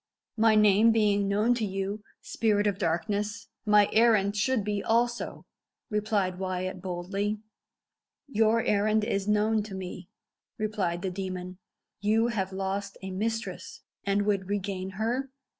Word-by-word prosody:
"My 220 -1 +4
name 210 +1 +6
being 205 -2 +2
known 210 +4 +3
to 235 -2 -2
you, 195 +1 -3 0.2
spirit 210 -2 +1
of 200 -2 0
darkness, 205 +5 -1 0.2
my 210 -1 +6
errand 215 -3 +4
should 220 +2 +1
be 205 0 -2
also," 240 +1 0 0.5
replied 205 -3 0
Wyat 185 -1 -3
boldly. 195 +3 -2 0.9
"Your 225 -2 +2
errand 210 +1 +2
is 200 -2 -1
known 210 +1 +2
to 205 -2 -7
me," 185 -1 -7 0.5
replied 200 -5 -1
the 190 - -1
demon. 185 -1 -5 0.4
"You 220 +3 +2
have 195 -5 -2
lost 195 +1 -3
a 190 - -5
mistress, 225 +4 -4 0.2
and 200 +1 +1
would 200 -2 0
regain 195 -2 -2
her?" 245 +5 -1
205 Hz, 135 wpm, -28 LUFS, 190-215 Hz, 0.9 s, name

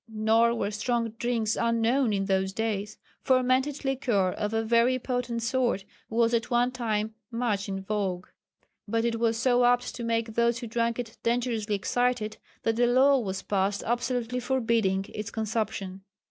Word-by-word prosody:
Nor 225 +2 +3
were 205 -3 -2
strong 230 +2 -1
drinks 230 -3 0
unknown 230 +2 +2
in 195 -1 0
those 190 -1 0
days. 215 -1 -2 0.2
Fermented 260 +2 +1
liquor 245 -9 +1
of 210 +2 -3
a 225 0 0
very 235 +3 +3
potent 245 -2 -2
sort 240 -5 0 0.2
was 230 +1 +2
at 230 0 0
one 245 0 +2
time 220 -3 -2 0.2
much 230 -5 -1
in 195 0 -4
vogue. 190 -3 -2 0.6
But 230 +2 0
it 230 -1 0
was 230 -1 +1
so 245 +1 +3
apt 245 0 +2
to 240 - -6
make 230 -1 -1
these 235 +1 +2
who 240 - -6
drank 230 0 -1
it 235 -2 -6
dangerously 230 -3 0
excited 240 +1 0 0.3
that 225 0 0
a 240 - +4
law 265 +3 +5
was 190 -4 -4
passed 200 0 0
absolutely 245 0 -1
forbidding 230 -6 +1
its 210 0 -4
consumption. 210 -4 -3
230 Hz, 160 wpm, -27 LUFS, 215-245 Hz, 0.6 s, law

